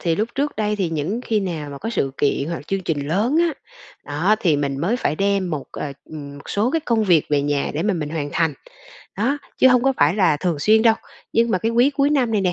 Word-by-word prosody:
thì 165 -2 +1
lúc 215 +4 0
trước 285 +2 -1
đây 210 -1 0
thì 190 -4 0
những 165 +9 -2
khi 215 -2 +1
nào 160 -6 -4
mà 140 - -8
có 225 - -4
sự 135 -12 0
kiện 145 +1 +1
hoặc 170 -3 -5
chương 195 0 -1
trình 145 -3 -2
lớn 215 - +1
á, 340 -1 +2 0.5
đó, 165 +9 +1
thì 160 -6 +3
mình 140 -1 -2
mới 195 +10 +1
phải 155 -10 -1
đem 195 -1 0
một, 150 -4 -3
ờ, 140 - -5
ừm, 145 -2 -9
một 140 - -14
số 215 +5 +1
cái 325 - 0
công 230 -7 +1
việc 170 -6 +4
về 145 -1 +2
nhà 145 -1 0
để 155 - -1
mà 205 +1 +1
mình 155 -4 -3
hoàn 150 -3 -3
thành. 165 -3 +1 0.6
Đó, 255 +8 0 0.2
chứ 260 - +7
hông 250 -1 +4
có 270 +1 +3
phải - - +3
là 185 -7 +3
thường 170 -1 -1
xuyên 215 +8 +4
đâu, 225 -1 +5 0.4
nhưng 230 0 +2
mà 185 - +2
cái 225 +4 -1
quý 245 +4 +4
cuối 280 0 +1
năm 260 -6 +1
này 210 - +2
nè, 180 -2 +1
190 Hz, 265 wpm, -21 LUFS, 150-225 Hz, 0.6 s, chứ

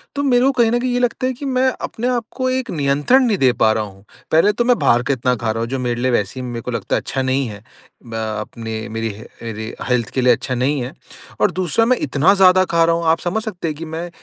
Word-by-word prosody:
तो 285 - -1
मेरे 250 -2 +3
को 270 - +4
कहीं 240 -4 +2
न 240 - +2
कहीं 250 0 -1
ये 245 - +1
लगता 245 +1 0
है 260 - -1
कि 265 +3 -8
मैं 260 -1 +1
अपने 240 +2 -3
आपको 250 +1 -2
एक 255 -1 -2
नियंत्रण 145 - +3
नहीं 215 -5 +1
दे 130 -4 +4
पा 110 - +5
रहा 110 - -1
हूँ। 95 -1 -12 0.3
पहले 165 +6 +5
तो 240 +2 0
मैं 245 -1 +4
बाहर 120 +1 +3
का 140 - 0
इतना 125 0 0
खा 115 -1 -2
रहा 115 - -3
हूँ 115 - -3
जो 135 +1 -2
मेरे 120 -1 -2
लिए 130 0 +1
वैसे 105 +1 -1
ही - - -5
मेरे 120 -1 -5
को 125 - -5
लगता 115 - -2
है - - 0
अच्छा 135 - -3
नहीं 130 0 0
है। 105 -2 -9 0.5
अ - - -4 0.3
अपने 110 +1 -7 0.2
मेरी 115 0 -3
ह 110 - -11 0.2
ऐरी 110 0 -5 0.2
हेल्थ 120 -3 +1
के 130 - 0
लिए 125 0 +5
अच्छा 125 +2 -3
नहीं 130 +2 0
है। 125 - -4 0.5
और - - +4
दूसरा 185 +5 +1
मैं 250 +2 +3
इतना 145 +7 +3
ज़्यादा 185 -1 +5
खा 165 0 +4
रहा 165 0 +2
हूँ, 170 0 -3
आप 160 +1 +3
समझ 205 +5 -2
सकते 185 -7 -4
हैं 155 - -3
कि 165 - -6
मैं 165 +2 -5
150 Hz, 280 wpm, -19 LUFS, -, 0.5 s, पा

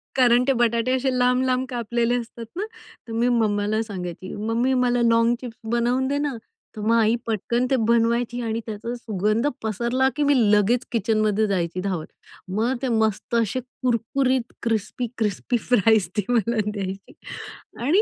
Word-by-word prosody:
कारण 245 -1 +5
ते 270 - +4
बटाटे 235 +1 +2
असे 265 +1 0
लांब-लांब 255 +1 +2
कापलेले 235 0 0
असतात 230 0 -8
ना, 405 +3 -2 0.4
तर - - -8
मी 235 +2 +1
मम्माला 215 -2 +1
सांगायची, 185 -3 -6
"मम्मी, 230 +5 0
मला 245 -1 +2
लॉग 230 +1 +4
चिप्स 235 -3 -8
बनवून 245 +2 +1
दे 285 +1 0
ना." 290 -3 -1 0.4
तर 215 - -6
मग 225 +2 +2
आई 225 0 +4
पटकन 235 +3 0
ते - - +5
बनवायची 235 +1 +2
आणि 225 0 -2
त्याचा 225 +2 -5
सुगंध 215 +1 0 0.2
पसरला 235 +5 +1
की 295 - +1
मी 285 0 +4 0.2
लगेच 210 +5 +3
किचनमध्ये 215 -1 +1
जायची 180 -2 -1
धावत. 185 -5 -2 0.4
मग 220 +7 0
ते 265 - -1
मस्त 220 +1 0
असे 230 +2 +1
कुरकुरीत 255 0 -1
क्रिस्पी 225 +2 -1
क्रिस्पी 220 +3 0
फ्राईज 220 -5 +4
ते 210 - +2
मला 235 -1 +1
द्यायची. 195 -1 -6 0.7
आणि 360 +9 +4
230 Hz, 155 wpm, -23 LUFS, 215-245 Hz, 0.7 s, कारण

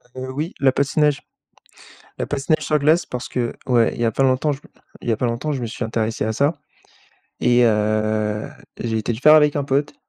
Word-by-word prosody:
Heu, 130 0 -5
oui, 155 +7 -4
la 135 -1 +4
patinage 140 +2 +1 1.0
La - - -2
patinage 145 +2 -1
sur 155 - +2
glace 155 +4 +3
parce 125 0 -6
que, 120 -2 -2
ouais, 120 -3 +3
il - - -6
y - - +2
a 115 - +2
pas 135 - 0
longtemps 130 +3 +2
je 135 - -5
me - - -19 0.3
il - - -4
y - - +3
a 110 - 0
pas 125 - -1
longtemps, 120 +6 -2
je 135 - -4
me - - -2
suis 115 +1 -4
intéressé 110 -1 -2
à 110 - -1
ça, 140 +7 0 0.8
et 120 0 +4
heu, 110 -1 0 0.3
j'ai 115 -1 -2
été 110 +2 -2
le 110 - -5
faire 155 +2 +7
avec 150 -1 +4
un 145 - 0
pote, 140 - -1
130 Hz, 225 wpm, -21 LUFS, 115-145 Hz, 1.0 s, faire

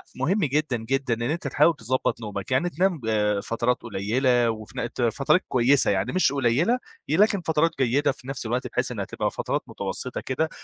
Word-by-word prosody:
مهم 155 +11 +1
جدًا، 145 -2 0
جدًا، 130 +2 -1
إن 115 - -4
أنت 160 -2 -3
تحاول 150 +4 +3
تضبّط 130 -1 -1
نومك، 105 0 -6
يعني 130 +8 +2
تنام 175 +1 0
ب 105 -2 +1
فترات 120 +2 0
قليّلة 120 +3 +1
وف 110 -1 -6
ن 120 - -3
ت - - -4
فتَرَات 135 +9 +2
كويسة 130 +2 +3
يعني 95 -1 0
مش 185 -5 +3
قليّلة 140 - +2 0.3
ي 155 - +2
لكن 205 -1 +4
فترات 160 0 +2
جيدة 135 +3 +2
في 130 - -13
نفْس 135 -3 -5
الوقت 120 +3 -1
بحيث - - -2
إنها - - -3
تبقى - - -2
فترات - - -2
متوسّطة - - -4
كده 155 +5 -1
130 Hz, 190 wpm, -25 LUFS, 115-150 Hz, 0.3 s, لكن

